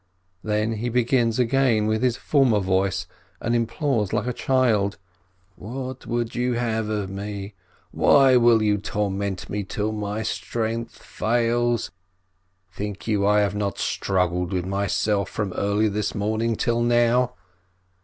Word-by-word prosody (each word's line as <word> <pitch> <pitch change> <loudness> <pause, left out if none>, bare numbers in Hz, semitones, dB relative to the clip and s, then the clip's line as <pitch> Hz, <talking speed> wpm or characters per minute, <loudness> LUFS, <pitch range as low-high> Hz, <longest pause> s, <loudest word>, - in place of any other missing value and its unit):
Then 110 +1 0
he 120 +3 -2
begins 120 -1 +2
again 125 -3 +2
with 110 +1 0
his 125 -2 +1
former 130 -7 +3
voice, 95 0 0 0.3
and 120 - -1
implores 115 -2 0
like 105 - 0
a 125 - -1
child: 115 -7 +1 0.6
"What 130 +5 -7
would 120 -1 -2
you 125 +1 0
have 110 -2 -1
of 105 -3 -2
me? 100 +1 -6 0.4
Why 135 -2 +5
will 120 -2 +5
you 105 -1 +2
torment 100 -2 -2
me 105 0 -3
till 105 +2 -2
my 105 0 -3
strength 115 +1 -3
fails? 120 +1 0 0.8
Think 105 0 -5
you 105 -3 +1
I 105 0 +4
have 100 0 0
not 105 -1 -2
strug 90 -3 0
gled 90 +1 -2
with 90 -1 -1
myself 100 +1 0
from 100 -4 -3
early 100 +2 +1
this 105 0 -2
morning 110 +2 0
till 120 +1 0
now?" 120 +1 +2
110 Hz, 145 wpm, -24 LUFS, 100-120 Hz, 0.8 s, Why